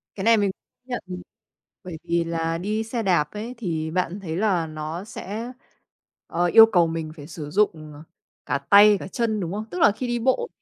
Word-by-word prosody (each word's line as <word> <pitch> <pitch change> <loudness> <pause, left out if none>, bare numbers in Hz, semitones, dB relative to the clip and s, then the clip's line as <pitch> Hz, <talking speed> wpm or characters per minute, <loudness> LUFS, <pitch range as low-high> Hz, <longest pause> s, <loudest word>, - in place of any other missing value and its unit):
Cái 190 - -5
này 230 0 +6
mình 205 -2 +1 0.4
nhận, 245 -2 -4
ừm, 180 -1 -7 0.6
bởi 180 -4 -7
vì 170 0 0
là 165 0 -2
đi 210 +5 -2
xe 225 0 -3
đạp 170 -6 +1
ấy, 220 +4 -6
thì 160 -7 -3
bạn 180 +2 -2
thấy 165 -5 -5
là 185 -6 +1
nó 155 +3 -6
sẽ, 220 +2 -6 0.8
ờ, 175 +1 0
yêu 225 +6 +8
cầu 180 -7 +3
mình 160 -1 -4
phải 145 -2 -11
sử 150 -3 -8
dụng 160 -6 0 0.5
cả 140 0 0
tay 205 +8 +6
cả - - -7
chân, 220 0 -1
đúng 180 -1 -4
không? 215 +1 -4
Tức 360 - -4
là 210 - +6
khi 245 +4 -5
đi 240 0 -1
bộ 260 - +1
185 Hz, 205 wpm, -24 LUFS, 165-220 Hz, 0.8 s, yêu